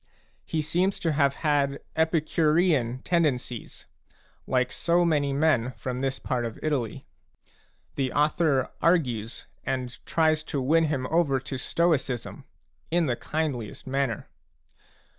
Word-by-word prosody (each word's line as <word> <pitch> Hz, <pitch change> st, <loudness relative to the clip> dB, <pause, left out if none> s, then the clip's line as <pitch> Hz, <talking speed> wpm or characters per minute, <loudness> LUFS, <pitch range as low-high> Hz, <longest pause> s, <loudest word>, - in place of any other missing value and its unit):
He 155 Hz, -1 st, -1 dB
seems 180 Hz, +5 st, +1 dB
to 165 Hz, -, +1 dB
have 140 Hz, -2 st, +2 dB
had 140 Hz, -2 st, +2 dB, 0.2 s
Epicurean 155 Hz, -4 st, +2 dB
tendencies, 140 Hz, -9 st, -1 dB, 0.6 s
like 125 Hz, -1 st, +1 dB
so 175 Hz, +1 st, +2 dB
many 145 Hz, -4 st, +2 dB
men 135 Hz, -4 st, +2 dB
from 125 Hz, 0 st, -4 dB
this 135 Hz, -1 st, -1 dB
part 125 Hz, -2 st, -2 dB
of 115 Hz, -2 st, -4 dB
Italy; 135 Hz, -8 st, -2 dB, 0.9 s
the 130 Hz, -2 st, -1 dB
author 150 Hz, -2 st, +2 dB
argues 125 Hz, -11 st, +1 dB, 0.2 s
and 130 Hz, -2 st, -4 dB
tries 155 Hz, -1 st, +2 dB
to 145 Hz, -, -2 dB
win 160 Hz, +5 st, +3 dB
him 140 Hz, -4 st, -1 dB
over 155 Hz, -5 st, +3 dB
to 135 Hz, +1 st, -6 dB
Stoicism, 135 Hz, -3 st, -1 dB, 0.4 s
in 170 Hz, 0 st, +2 dB
the 125 Hz, -4 st, 0 dB
kindliest 140 Hz, -7 st, -3 dB
manner. 135 Hz, -4 st, -1 dB
140 Hz, 120 wpm, -27 LUFS, 130-160 Hz, 0.9 s, win